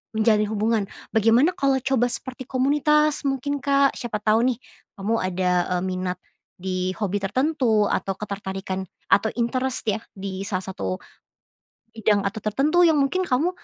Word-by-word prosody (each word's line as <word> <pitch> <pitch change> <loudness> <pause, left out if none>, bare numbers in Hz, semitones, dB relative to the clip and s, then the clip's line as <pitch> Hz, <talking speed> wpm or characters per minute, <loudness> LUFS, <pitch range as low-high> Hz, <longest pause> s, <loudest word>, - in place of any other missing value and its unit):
menjalin 215 -1 +3
hubungan. 220 0 +1 0.3
Bagaimana 230 - +4
kalau 275 -3 +2
coba 255 -3 +2
seperti 260 +1 -3
komunitas 295 +4 +2
mungkin, 275 +1 -1
Kak, 280 -1 +4
siapa 215 -3 -4
tahu 220 +2 +3
nih, - - -13 0.4
kamu 220 +4 0
ada, 185 0 0 0.3
eee, - - -4
minat 185 -1 -2 0.4
di 185 0 -2
hobi 205 -2 -1
tertentu 235 -2 +2
atau 195 -1 -1
ketertarikan 190 -2 -5 0.2
atau 220 +2 +4
interest 255 +2 -1
ya, 215 +1 0 0.2
di 195 0 -5
salah 185 -2 -2
satu 95 - -3 1.0
bidang 215 -2 +2
atau 200 +3 -2
tertentu 300 - +3
yang 325 - +4
mungkin 365 +7 +1
kamu 290 +6 +1
220 Hz, 145 wpm, -24 LUFS, 195-270 Hz, 1.0 s, Bagaimana